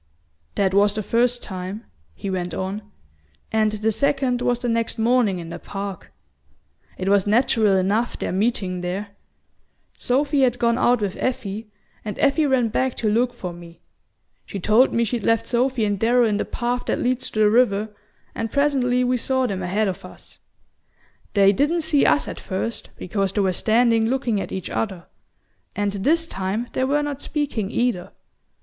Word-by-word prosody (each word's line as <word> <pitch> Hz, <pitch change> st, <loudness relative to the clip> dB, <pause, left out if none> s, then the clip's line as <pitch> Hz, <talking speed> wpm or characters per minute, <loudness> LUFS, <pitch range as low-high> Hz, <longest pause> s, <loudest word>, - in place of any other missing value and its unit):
"That 190 Hz, -2 st, +1 dB
was 205 Hz, +1 st, +4 dB
the 215 Hz, -, -2 dB
first 240 Hz, +3 st, +1 dB
time," 190 Hz, +4 st, -6 dB, 0.3 s
he 195 Hz, -, -5 dB
went 180 Hz, -1 st, -3 dB
on; 190 Hz, +3 st, -3 dB, 0.7 s
"and 220 Hz, -1 st, +2 dB
the 215 Hz, +1 st, 0 dB
second 270 Hz, 0 st, 0 dB
was 245 Hz, -1 st, +1 dB
the 245 Hz, 0 st, -4 dB
next 230 Hz, -1 st, 0 dB
morning 225 Hz, -4 st, +2 dB
in 170 Hz, -1 st, -7 dB
the -, -, -7 dB
park. 195 Hz, -2 st, -7 dB, 0.9 s
It 185 Hz, -, -4 dB
was 200 Hz, 0 st, +3 dB
natural 215 Hz, -2 st, +3 dB
enough, 205 Hz, +5 st, +1 dB
their -, -, -3 dB
meeting 190 Hz, -2 st, -1 dB
there. 190 Hz, +3 st, -3 dB, 0.9 s
Sophy 280 Hz, +3 st, +1 dB
had 245 Hz, -2 st, +3 dB
gone 235 Hz, 0 st, +1 dB
out 245 Hz, -2 st, +3 dB
with 200 Hz, -2 st, -2 dB
Effie, 225 Hz, -4 st, -3 dB, 0.3 s
and 210 Hz, -2 st, -5 dB
Effie 290 Hz, +2 st, +3 dB
ran 255 Hz, -4 st, +2 dB
back 260 Hz, +3 st, 0 dB
to 215 Hz, -2 st, 0 dB
look 240 Hz, +3 st, +2 dB
for 185 Hz, -7 st, -6 dB
me. 170 Hz, -1 st, -13 dB, 0.6 s
She 200 Hz, -, -6 dB
told 215 Hz, +7 st, +4 dB
me 235 Hz, -, +1 dB
she'd 230 Hz, 0 st, -2 dB
left 230 Hz, 0 st, +2 dB
Sophy 245 Hz, -1 st, +1 dB
and 205 Hz, -2 st, -1 dB
Darrow 240 Hz, +2 st, +4 dB
in 210 Hz, -2 st, +1 dB
the -, -, -1 dB
path 245 Hz, 0 st, -2 dB
that -, -, +1 dB
leads 255 Hz, +1 st, 0 dB
to -, -, -8 dB
the 215 Hz, -1 st, +5 dB
river, 220 Hz, -3 st, +3 dB, 0.4 s
and 225 Hz, -1 st, -4 dB
presently 265 Hz, -4 st, +2 dB
we 250 Hz, 0 st, +1 dB
saw 260 Hz, +2 st, 0 dB
them 195 Hz, -5 st, -2 dB
ahead 200 Hz, +4 st, 0 dB
of 190 Hz, -, -4 dB
us. -, -, -12 dB, 1.0 s
They 200 Hz, -1 st, +6 dB
didn't 295 Hz, -, +1 dB
see 305 Hz, -3 st, +3 dB
us 140 Hz, 0 st, +3 dB
at -, -, -6 dB
first, 210 Hz, +5 st, -4 dB
because 195 Hz, +1 st, -2 dB
they 205 Hz, -, +1 dB
were 190 Hz, -1 st, +1 dB
standing 230 Hz, +2 st, +3 dB
looking 240 Hz, -5 st, 0 dB
at -, -, -6 dB
each 190 Hz, -, -5 dB
other; 190 Hz, -6 st, -3 dB, 0.7 s
and 205 Hz, -1 st, 0 dB
this 300 Hz, +13 st, +1 dB
time 205 Hz, 0 st, -3 dB
they 260 Hz, -, +1 dB
were 290 Hz, +2 st, +1 dB
not 290 Hz, -1 st, -4 dB
speaking 280 Hz, -10 st, -2 dB
either. 235 Hz, -6 st, -1 dB
225 Hz, 180 wpm, -22 LUFS, 195-250 Hz, 1.0 s, They